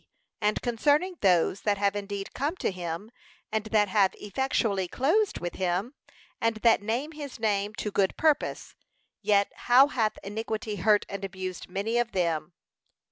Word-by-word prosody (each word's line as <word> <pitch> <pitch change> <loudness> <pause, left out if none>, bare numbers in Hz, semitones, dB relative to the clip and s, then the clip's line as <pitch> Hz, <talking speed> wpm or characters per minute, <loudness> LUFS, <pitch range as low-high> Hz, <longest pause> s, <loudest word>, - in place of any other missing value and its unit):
And 210 0 +1
concerning 290 +10 +1
those 185 0 +3
that 205 -1 +1
have 200 0 +1
indeed 200 -1 -5
come 290 +6 -1
to - - -1
him, 180 +3 -5 0.4
and 220 0 -1
that 215 -1 +2
have 195 -1 +3
effectually 210 -4 -1
closed 330 - +1
with 175 0 -4
him, 185 +7 -1 0.5
and 230 0 +2
that 230 -3 +5
name 240 +9 -2
his 290 -5 -8
name 210 -1 0
to 210 - -3
good 195 -1 +1
purpose; 310 -2 +1 0.5
yet 200 -1 +3 0.2
how 265 +4 +7
hath 220 -6 0
iniquity 215 +1 -4
hurt 210 +2 +3
and 200 0 -6
abused 190 -2 -5
many 210 +6 -1
of 240 -1 -1
them. 170 -3 0
210 Hz, 155 wpm, -28 LUFS, 195-240 Hz, 0.5 s, how